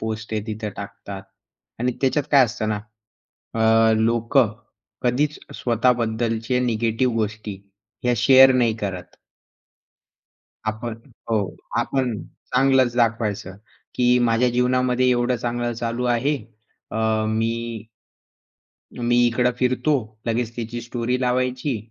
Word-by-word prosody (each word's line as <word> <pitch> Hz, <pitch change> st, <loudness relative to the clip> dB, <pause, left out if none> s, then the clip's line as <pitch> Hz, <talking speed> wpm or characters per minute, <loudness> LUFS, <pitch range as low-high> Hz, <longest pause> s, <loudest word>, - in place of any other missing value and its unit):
Post 110 Hz, 0 st, -4 dB
ते 110 Hz, -1 st, -1 dB
तिथे 110 Hz, -1 st, -4 dB
टाकतात 100 Hz, -1 st, -8 dB, 0.6 s
आणि 125 Hz, +1 st, +1 dB
त्याच्यात 135 Hz, +1 st, +1 dB
काय 140 Hz, -3 st, +7 dB
असतं 110 Hz, -2 st, -3 dB
ना? 105 Hz, -1 st, -1 dB, 0.8 s
अ, 110 Hz, 0 st, +5 dB
लोकं 115 Hz, +1 st, +2 dB, 0.5 s
कधीच 140 Hz, +5 st, 0 dB, 0.2 s
स्वतःबद्दलचे 115 Hz, 0 st, 0 dB
निगेटिव्ह 115 Hz, 0 st, 0 dB
गोष्टी 110 Hz, -1 st, -3 dB, 0.5 s
ह्या 125 Hz, -, +2 dB
शेअर 130 Hz, +3 st, +7 dB
नाही 120 Hz, -3 st, +2 dB
करत. 95 Hz, -4 st, -6 dB, 1.5 s
आपण 110 Hz, +2 st, -3 dB, 0.4 s
हो. 105 Hz, -4 st, 0 dB, 0.2 s
आपण 125 Hz, -5 st, 0 dB, 0.4 s
चांगलच 130 Hz, -2 st, +4 dB
दाखवायचं 110 Hz, -5 st, 0 dB, 0.4 s
की 125 Hz, 0 st, +3 dB
माझ्या 120 Hz, 0 st, +3 dB
जीवनामध्ये 125 Hz, +1 st, +2 dB
एवढं 125 Hz, 0 st, +1 dB
चांगलं 120 Hz, 0 st, -2 dB
चालू 115 Hz, +1 st, -3 dB
आहे. 125 Hz, +5 st, +1 dB, 0.5 s
अ, -, -, -4 dB, 0.3 s
मी 115 Hz, 0 st, -2 dB, 1.1 s
मी 120 Hz, 0 st, +1 dB
इकडं 120 Hz, +1 st, +2 dB
फिरतो. 130 Hz, +4 st, +2 dB, 0.3 s
लगेच 115 Hz, 0 st, -1 dB
तिची 120 Hz, 0 st, -4 dB
स्टोरी 120 Hz, +1 st, -2 dB
लावायची. 125 Hz, +1 st, 0 dB
120 Hz, 110 wpm, -22 LUFS, 110-125 Hz, 1.5 s, काय